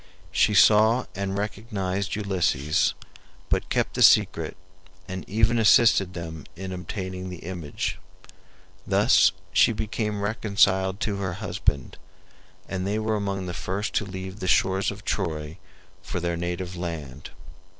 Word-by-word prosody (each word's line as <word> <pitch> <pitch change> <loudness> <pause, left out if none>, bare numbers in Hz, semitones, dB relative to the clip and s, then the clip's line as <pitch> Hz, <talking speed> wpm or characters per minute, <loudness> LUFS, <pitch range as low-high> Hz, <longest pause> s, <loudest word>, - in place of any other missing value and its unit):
She 105 - +3
saw 110 +4 +5
and 95 0 -3
recognized 100 -2 -3
Ulysses, 90 -8 +1 0.5
but - - 0
kept - - 0
the - - -2
secret 80 +1 +4 0.5
and 95 -1 -5
even 115 +3 +2
assisted 105 -4 +5
them 80 -3 -7
in 95 +2 -6
obtaining 95 0 -5
the 90 -3 -9
image. 85 -5 -4 0.9
Thus - - +5 0.2
she 115 - +5
became 105 -1 -3
reconciled 100 -3 +2
to 105 -3 -1
her 95 -3 -3
husband, 90 - -2 0.7
and 95 0 -3
they 105 +2 0
were 110 0 0
among 100 -2 -2
the 90 - -5
first 95 +5 -3
to - - +1
leave 95 0 -7
the 95 - -4
shores 95 +1 +2
of 105 +1 -8
Troy 80 -3 -3 0.4
for 90 - -4
their 85 0 -1
native 90 +1 -4
land. 80 -6 -6
95 Hz, 135 wpm, -25 LUFS, 90-105 Hz, 0.9 s, saw